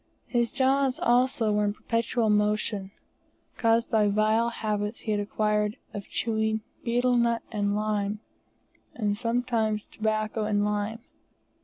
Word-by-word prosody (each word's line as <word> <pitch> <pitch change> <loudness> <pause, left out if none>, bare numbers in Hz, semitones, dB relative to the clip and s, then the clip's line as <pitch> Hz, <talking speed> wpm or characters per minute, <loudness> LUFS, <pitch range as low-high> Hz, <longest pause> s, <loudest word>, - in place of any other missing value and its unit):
His 235 -2 0
jaws 270 0 +2
also 240 -2 +2
were 210 0 +2
in 205 0 +1
perpetual 230 0 0
motion, 210 -1 +1 0.7
caused 230 0 +2
by 215 -2 +4
vile 215 +3 +2
habits 210 -1 -3
he 215 - -3
had 210 - +1
acquired 210 +1 0 0.2
of 200 -2 -6
chewing 220 -1 0 0.2
betel 245 +1 +2
nut 235 -1 +2
and 205 -2 0
lime, 210 -1 -1 0.8
and 205 -3 0
sometimes 230 -2 0
tobacco 215 0 -1
and 205 -1 +1
lime. 210 +2 -2
215 Hz, 130 wpm, -27 LUFS, 210-235 Hz, 0.8 s, by